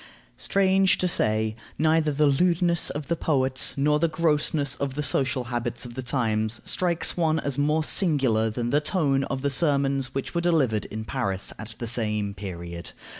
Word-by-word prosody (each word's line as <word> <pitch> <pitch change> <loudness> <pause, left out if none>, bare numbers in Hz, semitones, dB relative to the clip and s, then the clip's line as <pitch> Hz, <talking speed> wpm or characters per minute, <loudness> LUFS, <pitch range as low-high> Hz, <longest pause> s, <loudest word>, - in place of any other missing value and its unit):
Strange 190 -1 +2
to 180 - 0
say, 110 -8 +1 0.2
neither 155 0 +2
the 150 +1 +2
lewdness 170 +4 +2
of 145 -1 -5
the 170 - 0
poets 130 -5 0
nor 150 +2 +2
the 170 - +2
grossness 150 -3 0
of 135 -2 -3
the 150 - -2
social 135 -2 0
habits 120 0 -3
of 120 - -9
the 130 - -5
times 115 -3 -1
strikes 175 -2 +1
one 160 -2 +1
as 140 -2 -2
more 150 +2 +1
singular 135 - +2
than 120 +2 -3
the 145 - +3
tone 145 -4 +1
of 135 0 -4
the 140 - +1
sermons 135 -3 +1
which 135 - -4
were 170 - 0
delivered 145 -11 +1
in 110 +1 -6
Paris 100 -7 -2
at 110 +1 -9
the 120 - -5
same 105 -3 -1
period. 85 -3 -8
140 Hz, 175 wpm, -25 LUFS, 115-155 Hz, 0.2 s, the